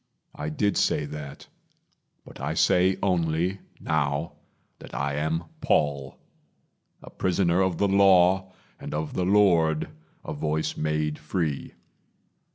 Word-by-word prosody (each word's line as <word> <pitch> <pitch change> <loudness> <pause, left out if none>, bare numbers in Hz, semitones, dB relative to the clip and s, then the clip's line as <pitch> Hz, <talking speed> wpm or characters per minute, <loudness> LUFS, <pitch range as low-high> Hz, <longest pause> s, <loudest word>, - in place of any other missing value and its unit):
I 75 - -5
did 100 +6 0
say - - +1
that, 75 -1 -8 0.8
But - - -13
I 75 +3 -2
say 90 +3 +3
only, 90 0 0 0.2
now, 75 +1 -1 0.5
that - - -11
I 70 +1 -1
am 80 +2 -1 0.2
Paul 70 -2 0 0.9
A - - -11
prisoner 90 -1 +1
of 95 -3 0
the 100 - +2
Law, 95 -1 +4 0.3
and - - -6
of 75 0 -3
the 90 - -1
Lord 85 -6 +3 0.4
A - - -4
voice 75 +1 -2
made 75 0 -1
free. 75 -2 -3
80 Hz, 125 wpm, -26 LUFS, 75-95 Hz, 0.9 s, Law